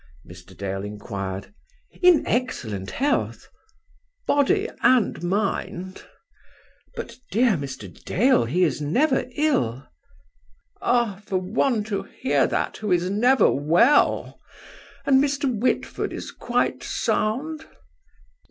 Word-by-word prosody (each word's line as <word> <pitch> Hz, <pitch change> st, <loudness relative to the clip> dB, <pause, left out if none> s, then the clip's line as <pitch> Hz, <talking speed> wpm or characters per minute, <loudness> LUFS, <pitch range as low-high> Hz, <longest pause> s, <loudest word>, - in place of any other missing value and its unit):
Mr. 90 Hz, +1 st, -14 dB
Dale 95 Hz, 0 st, -4 dB
inquired. 100 Hz, -, -6 dB, 0.5 s
"In 360 Hz, -3 st, +5 dB
excellent 115 Hz, -, -2 dB
health." 285 Hz, +3 st, -1 dB, 0.8 s
"Body 390 Hz, +9 st, +2 dB
and 245 Hz, -9 st, +3 dB
mind?" 190 Hz, 0 st, -2 dB, 0.9 s
"But, 470 Hz, -, -7 dB
dear 235 Hz, +4 st, +3 dB
Mr. 140 Hz, -, -4 dB, 0.2 s
Dale, 245 Hz, -, +3 dB
he 170 Hz, +10 st, +1 dB
is 155 Hz, -3 st, 0 dB
never 260 Hz, -, +1 dB
ill." 140 Hz, -, 0 dB, 1.0 s
"Ah! 230 Hz, -5 st, +1 dB
for 190 Hz, -, 0 dB
one 215 Hz, +5 st, 0 dB
to 205 Hz, -2 st, -3 dB
hear -, -, 0 dB
that -, -, -2 dB
who 210 Hz, -3 st, -3 dB
is 180 Hz, +1 st, +2 dB
never 240 Hz, +3 st, +4 dB
well! 170 Hz, -, +3 dB, 0.7 s
And 270 Hz, 0 st, +5 dB
Mr. 285 Hz, 0 st, -1 dB
Whitford 235 Hz, +4 st, -1 dB
is -, -, -6 dB
quite -, -, -1 dB
sound?" 300 Hz, +9 st, -2 dB
205 Hz, 105 wpm, -24 LUFS, -, 1.0 s, In